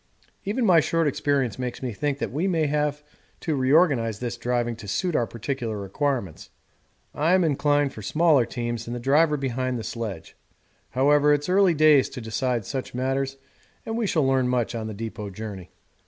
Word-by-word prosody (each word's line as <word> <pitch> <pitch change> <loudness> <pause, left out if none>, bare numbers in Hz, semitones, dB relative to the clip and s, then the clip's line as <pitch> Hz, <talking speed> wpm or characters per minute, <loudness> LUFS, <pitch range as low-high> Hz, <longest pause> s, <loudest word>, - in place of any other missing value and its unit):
Even 225 +5 0
my 180 -5 +6
short 165 +1 +1
experience 140 -6 0
makes 125 0 -4
me 125 -3 -3
think 145 +6 -2
that - - -3
we 155 +9 -1
may 165 -4 +1
have 150 0 -1 0.4
to 160 - -1
reorganise 130 - +3
this 120 +1 -4
driving 120 0 -1
to 110 - -10
suit 175 - -1
our 120 - +1
particular 115 -1 -4
requirements. 100 - -3 0.6
I 160 +4 +2
am 185 - +3
inclined 145 -2 +1
for 110 - -9
smaller 150 - +3
teams 120 -2 -4
and 120 - -4
the - - -4
driver 150 +5 +3
behind 130 -2 -2
the 115 - -5
sledge. 105 -9 -6 0.5
However, 145 +3 +4
it's 145 +3 -4
early 190 -2 +4
days 155 -3 +5
to 135 - -8
decide 115 0 -2
such 130 0 -5
matters, 135 +1 -1 0.5
and 225 - -3
we 230 -2 0
shall 155 -6 +1
learn 130 -1 +2
much 125 -2 0
on 110 -2 -4
the 110 - -6
depot 110 -1 -6
journey. 100 -2 -8
135 Hz, 185 wpm, -25 LUFS, 115-150 Hz, 0.6 s, my